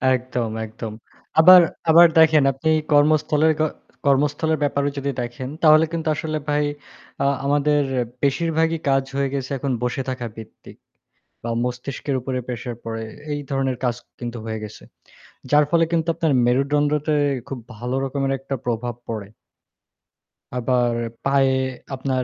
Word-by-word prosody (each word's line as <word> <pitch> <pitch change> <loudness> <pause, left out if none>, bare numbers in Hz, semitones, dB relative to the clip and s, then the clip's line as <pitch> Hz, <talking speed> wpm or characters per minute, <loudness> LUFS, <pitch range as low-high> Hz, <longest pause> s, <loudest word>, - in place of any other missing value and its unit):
একদম, 125 -2 -3 0.2
একদম। 110 0 -7 0.5
আবার 180 +2 +10 0.3
আবার 170 +2 +8
দেখেন 160 -2 +6
আপনি 160 +5 0 0.2
কর্মস্থল 150 0 +3 0.2
ক - - +2 0.4
কর্মস্থলের 145 +3 +2
ব্যাপারেও 140 0 0
যদি 140 0 -2
দেখেন 120 +2 -5
তাহলে 155 0 +7
কিন্তু 165 -1 -3
আসলে 155 +1 -3
ভাই 150 0 +2 0.6
আ - - +1 0.2
আমাদের 145 +1 +2 0.4
বেশিরভাগই 160 +3 +1
কাজ 135 -1 +3
হয়ে 140 -1 0
গেছে 135 -1 -3
এখন 135 +1 -2
বসে 125 +2 -1
থাকা 130 -2 -4
ভিত্তিক। 110 -1 -12 0.7
বা 115 - -2
মস্তিষ্কের 125 +2 -3
উপরে 130 +1 -3
প্রেশার 120 -1 -5
পড়ে। 115 0 -4 0.3
এই 145 - -2
ধরনের 135 -2 0
কাজ 120 -1 +1 0.2
কিন্তু 120 -1 -5
হয়ে 110 -1 -3
গেছে। 105 - -10 0.7
যার 150 0 +5
ফলে 170 -1 +4
কিন্তু 165 0 0
আপনার 160 -3 0
মেরুদণ্ডতে 145 +4 +1 0.3
খুব 135 - -5 0.2
ভালো 125 +4 -3
রকমের 135 0 -1
একটা 135 +1 -5
প্রভাব 120 0 -2
পড়ে। 110 -3 -5 1.3
আবার 125 -1 +1 0.3
পায়ে 135 -1 +3 0.4
আপনার, 130 -1 -1
135 Hz, 140 wpm, -22 LUFS, 125-150 Hz, 1.3 s, আবার